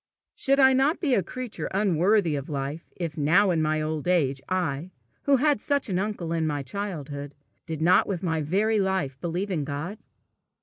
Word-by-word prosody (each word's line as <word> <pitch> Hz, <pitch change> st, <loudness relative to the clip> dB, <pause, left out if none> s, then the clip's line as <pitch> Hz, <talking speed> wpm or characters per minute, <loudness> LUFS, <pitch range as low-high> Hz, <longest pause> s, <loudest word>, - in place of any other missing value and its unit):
Should 275 Hz, +1 st, +1 dB
I 265 Hz, -1 st, +7 dB
not 270 Hz, +5 st, +2 dB
be 290 Hz, -7 st, +1 dB
a 205 Hz, -, +4 dB
creature 250 Hz, +6 st, -5 dB
unworthy 190 Hz, -2 st, +2 dB
of 140 Hz, +1 st, -5 dB
life, 145 Hz, +2 st, -4 dB
if, 165 Hz, -3 st, -4 dB
now 180 Hz, +7 st, +4 dB
in 165 Hz, -2 st, +1 dB
my 155 Hz, 0 st, +1 dB
old 155 Hz, 0 st, -3 dB
age, 140 Hz, -7 st, +2 dB
I, 175 Hz, -3 st, -1 dB, 0.4 s
who 280 Hz, -1 st, +5 dB
had 290 Hz, -3 st, +2 dB
such 280 Hz, -5 st, 0 dB
an 185 Hz, -1 st, 0 dB
uncle 190 Hz, -5 st, -2 dB
in 160 Hz, -1 st, 0 dB
my 145 Hz, -2 st, -2 dB
childhood, 145 Hz, -4 st, -5 dB, 0.3 s
did 160 Hz, -2 st, -3 dB
not 175 Hz, +2 st, +5 dB
with 190 Hz, -3 st, -3 dB
my 160 Hz, -3 st, 0 dB
very 205 Hz, +8 st, +1 dB
life 190 Hz, -9 st, -1 dB
believe 180 Hz, +4 st, -2 dB
in 160 Hz, -5 st, 0 dB
God? 150 Hz, +9 st, -5 dB
175 Hz, 185 wpm, -26 LUFS, 155-205 Hz, 0.4 s, I